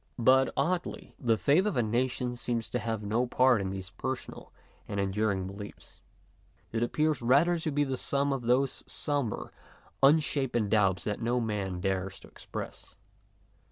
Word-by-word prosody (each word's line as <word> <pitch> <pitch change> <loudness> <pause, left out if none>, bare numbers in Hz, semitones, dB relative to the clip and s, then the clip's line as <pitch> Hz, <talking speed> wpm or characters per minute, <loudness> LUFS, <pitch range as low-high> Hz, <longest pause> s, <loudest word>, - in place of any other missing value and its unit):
But, 130 +2 +4
oddly, 175 +1 -1
the 115 -4 +2
faith 160 - +3
of 210 - -1
a 120 - +3
nation 125 +2 -1
seems 120 -1 -3
to 125 - 0
have 110 -2 -3
no 115 +5 0
part 125 -2 +4
in 95 - -2
these 95 0 -6
personal 125 +6 -5 0.4
and 100 -1 -3
enduring 100 -1 0
beliefs. 100 +2 -10 0.7
It 115 - -1
appears 150 +3 +1
rather 145 +9 +4
to 160 - -2
be 145 0 +1
the 135 -2 -2
sum 140 +1 0
of 135 - -2
those 125 +3 +1
sombre, 140 -7 -1 0.5
unshapen 135 -6 +3
doubts 95 -5 +2
that 105 +1 -3
no 120 +2 +1
man 100 -5 -2
dares 95 0 -2
to - - -13
express. - - -8
120 Hz, 160 wpm, -29 LUFS, 105-135 Hz, 0.7 s, But